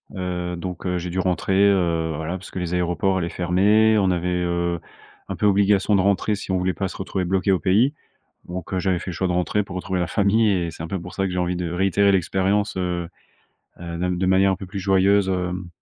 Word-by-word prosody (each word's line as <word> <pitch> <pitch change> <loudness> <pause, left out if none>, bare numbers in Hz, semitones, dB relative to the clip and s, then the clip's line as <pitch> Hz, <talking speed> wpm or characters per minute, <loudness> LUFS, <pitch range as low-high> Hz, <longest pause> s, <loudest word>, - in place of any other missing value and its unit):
Heu, 90 -1 -3
donc, 90 +1 -6
heu, 90 0 0
j'ai 90 0 -4
dû 95 - -2
rentrer, 95 +1 0 0.2
heu, 85 -4 +1
voilà 80 +4 -4
parce 95 - -11
que - - -9
les 90 -1 -3
aéroports 90 +2 0
allaient 85 -1 -2
fermer, 105 +6 +3
on 95 - +2
avait, 90 0 0
heu, 85 -1 -1 0.5
un - - -3
peu - - -1
obligation 100 0 +3
de 95 - +3
rentrer 100 +2 +1
si 100 - -6
on 95 - +2
voulait 90 0 0
pas 95 - -2
se - - -9
retrouver 95 -1 -3
bloqué 95 +2 +1
au 95 - +2
pays. 110 +10 +3 0.5
Donc, 90 +1 -6
heu, - - +1
j'avais 90 -1 0
fait 90 - -6
le - - -6
choix 95 - 0
de - - 0
rentrer 90 +4 0
pour 95 -2 -9
retrouver 90 0 -2
la 90 - 0
famille, 105 +4 +2
et 90 -4 0
c'est 80 - -9
un 80 - -4
peu 95 0 -3
pour 90 +1 -9
ça 95 - -1
que 95 - -1
j'ai 90 - -2
envie 90 0 0
de 85 -2 -3
réitérer 95 +3 +2
l'expérience, 95 +3 0
heu, 90 -2 -2 0.7
heu, 85 -1 -6
de 90 - -2
m 90 -1 -1
de 95 - 0
manière 95 +1 +4
un 95 - 0
peu 95 - -8
plus 100 +1 -6
joyeuse, 95 +1 +3
hem 90 -1 -2
95 Hz, 250 wpm, -22 LUFS, 90-95 Hz, 0.7 s, manière